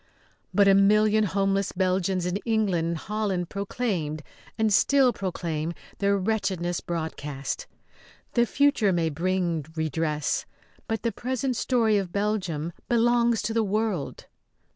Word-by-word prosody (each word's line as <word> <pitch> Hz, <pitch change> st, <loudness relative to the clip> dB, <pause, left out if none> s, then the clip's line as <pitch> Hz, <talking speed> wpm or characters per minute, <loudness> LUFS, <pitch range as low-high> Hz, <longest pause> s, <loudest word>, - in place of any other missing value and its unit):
But 200 Hz, +2 st, +4 dB
a 195 Hz, -, +7 dB
million 210 Hz, +2 st, +4 dB
homeless 195 Hz, 0 st, 0 dB
Belgians 185 Hz, 0 st, 0 dB
in 180 Hz, +2 st, -1 dB
England 205 Hz, -7 st, 0 dB
and 170 Hz, 0 st, -1 dB
Holland 195 Hz, -2 st, -2 dB
proclaimed 190 Hz, -7 st, -2 dB, 0.3 s
and 220 Hz, -2 st, +2 dB
still 265 Hz, +3 st, +4 dB
proclaim 170 Hz, -4 st, -3 dB, 0.3 s
their 200 Hz, 0 st, +2 dB
wretchedness 185 Hz, -4 st, -1 dB
broadcast. 150 Hz, -5 st, -4 dB, 0.7 s
The 240 Hz, -1 st, +3 dB
future 280 Hz, -8 st, +3 dB
may 170 Hz, -2 st, +1 dB
bring 170 Hz, 0 st, -1 dB
redress, 155 Hz, -1 st, -1 dB, 0.4 s
but 225 Hz, -1 st, -2 dB
the 230 Hz, -, +1 dB
present 255 Hz, +3 st, -2 dB
story 225 Hz, -4 st, +2 dB
of 185 Hz, -3 st, -4 dB
Belgium 185 Hz, -6 st, -1 dB, 0.2 s
belongs 235 Hz, -1 st, +3 dB
to 225 Hz, -, -2 dB
the 225 Hz, 0 st, +2 dB
world. 210 Hz, -6 st, -2 dB
195 Hz, 125 wpm, -26 LUFS, 170-220 Hz, 0.7 s, a